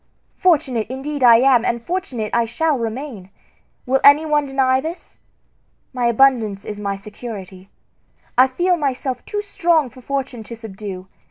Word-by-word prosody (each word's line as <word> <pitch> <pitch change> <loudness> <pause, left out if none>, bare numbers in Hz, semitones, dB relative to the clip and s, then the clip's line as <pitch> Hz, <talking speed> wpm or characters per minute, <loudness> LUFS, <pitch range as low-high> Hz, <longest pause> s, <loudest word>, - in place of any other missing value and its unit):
Fortunate 275 - +1
indeed 270 +2 -4
am 245 +1 +6
I, - - +1
and 235 - -1
fortunate 250 - -4
I 235 0 +2
shall 305 +7 0
remain! 230 -4 -5 0.6
Will 265 +1 +2
any 285 +3 +7
one 295 -2 +1
deny 265 -1 +2
this? 330 +4 -8 0.7
My 245 -2 0
abundance 230 -5 +2
is 210 -1 -6
my 200 -1 -2
security. 195 -2 -9 0.7
I 255 +1 +6
feel 355 +7 +1
myself 265 -3 -2
too 415 -1 -3
strong 340 - +1
for 255 - -14
Fortune 270 -2 -4
to 235 - -8
subdue. 195 -4 -8
255 Hz, 150 wpm, -20 LUFS, 225-285 Hz, 0.7 s, any